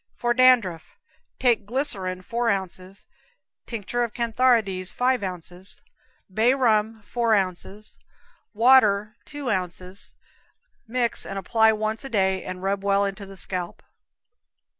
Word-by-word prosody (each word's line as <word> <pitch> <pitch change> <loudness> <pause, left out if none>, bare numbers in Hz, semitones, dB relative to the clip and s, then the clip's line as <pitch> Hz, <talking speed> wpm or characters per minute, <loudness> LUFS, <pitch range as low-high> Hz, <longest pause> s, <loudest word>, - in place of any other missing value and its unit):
For 240 0 0
Dandruff. 240 - +3 0.4
Take 230 -5 +1
glycerine, 195 -8 -2
four 235 +4 -1
ounces; 190 -1 -4 0.6
tincture 230 +1 -3
of 235 -3 -5
cantharides, 225 -6 +2
five 250 -1 +1
ounces; 180 0 -6 0.5
bay 230 +6 +3
rum, 220 -3 +1
four 230 0 +1
ounces; 195 +2 -4 0.5
water, 215 -3 +4
two 290 -4 -4
ounces. 185 0 -4 0.7
Mix 240 0 +1
and 195 - -6
apply 220 +3 +3
once 215 +2 -3
a 270 - -7
day, 190 -4 +1
and 185 0 -7
rub 195 0 -1
well 200 0 +2
into 200 0 -5
the 195 0 -11
scalp. 180 -2 -3
210 Hz, 120 wpm, -24 LUFS, 190-235 Hz, 0.7 s, water